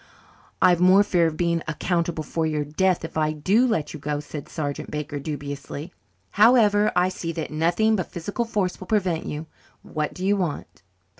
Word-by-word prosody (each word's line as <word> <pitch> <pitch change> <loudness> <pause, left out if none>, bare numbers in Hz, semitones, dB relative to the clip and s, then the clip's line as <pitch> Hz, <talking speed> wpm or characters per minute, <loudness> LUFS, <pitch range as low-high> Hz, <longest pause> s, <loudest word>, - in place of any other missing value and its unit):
"I've 175 -2 +5
more 185 +3 +6
fear 175 -5 +2
of 155 -1 -4
being 170 -1 +1
accountable 170 0 -1
for 160 +1 -1
your 150 -1 -1
death 175 +4 +1
if 160 - -7
I 155 -1 +1
do 195 +12 +2
let 190 -11 -1
you - - -7
go," 145 +1 -2
said 150 0 -8
Sergeant 145 -3 -4
Baker 150 -1 -4
dubiously. 145 +2 -6 0.4
"However, 210 -2 +5
I 180 +1 +4
see 170 -2 -4
that 160 -2 -4
nothing 175 +8 +2
but 185 - -4
physical 200 +7 -3
force 200 -5 -1
will 185 - -9
prevent 185 -6 0
you. 150 +2 -5 0.4
What 155 -1 -3
do 185 - -4
you 200 +1 +3
want?" 175 -7 -4
170 Hz, 180 wpm, -24 LUFS, 155-190 Hz, 0.4 s, more